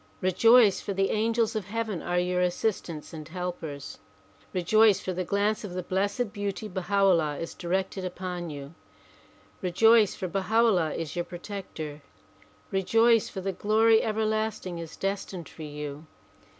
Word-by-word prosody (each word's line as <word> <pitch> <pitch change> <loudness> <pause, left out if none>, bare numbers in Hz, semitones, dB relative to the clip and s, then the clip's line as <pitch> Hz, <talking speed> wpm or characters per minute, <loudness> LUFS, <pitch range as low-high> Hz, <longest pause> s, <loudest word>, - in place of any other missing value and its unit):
Rejoice, 210 +3 +5
for 200 - -3
the 195 0 +1
angels 225 +1 +1
of 215 -4 -2
heaven 220 -3 -3
are 175 0 -1
your 180 0 +1
assistants 180 -4 -2
and 155 -2 -8
helpers. 165 -5 -6 0.5
Rejoice, 205 +3 +4
for 185 - -4
the 185 +1 -2
glance 205 +4 0
of 195 -4 -6
the 185 - -3
Blessed 200 +5 -1
Beauty 205 +1 -3
Baha 195 +1 0
'Ullah 165 -6 +3
is 165 - -5
directed 190 +2 -2
upon 180 -1 -4
you. 145 0 -8 0.9
Rejoice, 215 +3 +4
for 185 - -4
Baha 195 +4 -2
'Ullah 180 -9 +2
is 160 -3 -4
your 175 0 -1
protector. 175 -5 -7 0.7
Rejoice, 225 +4 +3
for 190 - -6
the 195 +1 -2
glory 220 +3 +4
everlasting 215 -4 -1
is 165 -1 -8
destined 195 -3 -3
for - - -13
you. 150 0 -7
190 Hz, 150 wpm, -27 LUFS, 175-215 Hz, 0.9 s, Rejoice